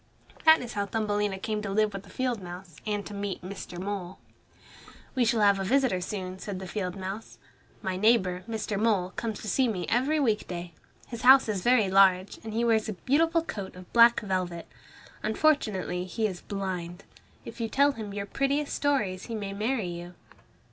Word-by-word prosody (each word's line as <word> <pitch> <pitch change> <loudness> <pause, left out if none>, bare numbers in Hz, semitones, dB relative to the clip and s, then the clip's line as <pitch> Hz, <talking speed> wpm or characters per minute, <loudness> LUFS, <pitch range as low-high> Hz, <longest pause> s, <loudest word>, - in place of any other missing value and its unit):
That 315 0 +8
is 245 -1 -6
how 200 -1 -1
Thumbelina 205 -2 -1
came 210 +2 -3
to 210 - -4
live 210 +1 +1
with 195 - -5
the 200 - -17
field 250 -4 -2
mouse 175 -1 -9
and 205 -1 -1
to 205 - -8
meet 200 -2 -4
Mr. 185 -2 -7
Mole. 190 -1 -4 1.0
"We 255 - +2
shall 230 -1 +2
have 200 -1 +5
a - - -1
visitor 245 -4 +2
soon," 185 -1 -5
said 200 -1 -5
the 190 - -6
field 185 -1 -3
mouse. 195 +3 -6 0.5
"My 185 -1 -2
neighbor, 185 -4 +3
Mr. 215 -2 -2
Mole, 205 -5 +1
comes 220 -3 -4
to - - -6
see 255 +6 +2
me 195 -6 -2
every 270 +7 +2
week 220 -7 +1
day. 175 -1 -6 0.3
His 235 -2 -7
house 265 0 +7
is 205 -4 -1
very 240 -1 +4
large, 190 0 +4
and 220 - -6
he 230 +2 0
wears 220 -2 +2
a - - -2
beautiful 320 - +2
coat 200 - -6
of 180 0 -13
black 235 0 +7
velvet. 185 -4 -3 0.5
Unfortunately, 215 - +1
he 220 +4 -2
is 185 -4 -3
blind. 185 -2 -5 0.4
If - - -8
you 225 - -1
tell 280 +4 +4
him 220 -6 -7
your 200 0 -4
prettiest 275 +7 -1
stories 210 -11 0
he 230 - -5
may 200 -2 -4
marry 220 +2 -1
you." 175 +1 -7
205 Hz, 190 wpm, -28 LUFS, 185-230 Hz, 1.0 s, That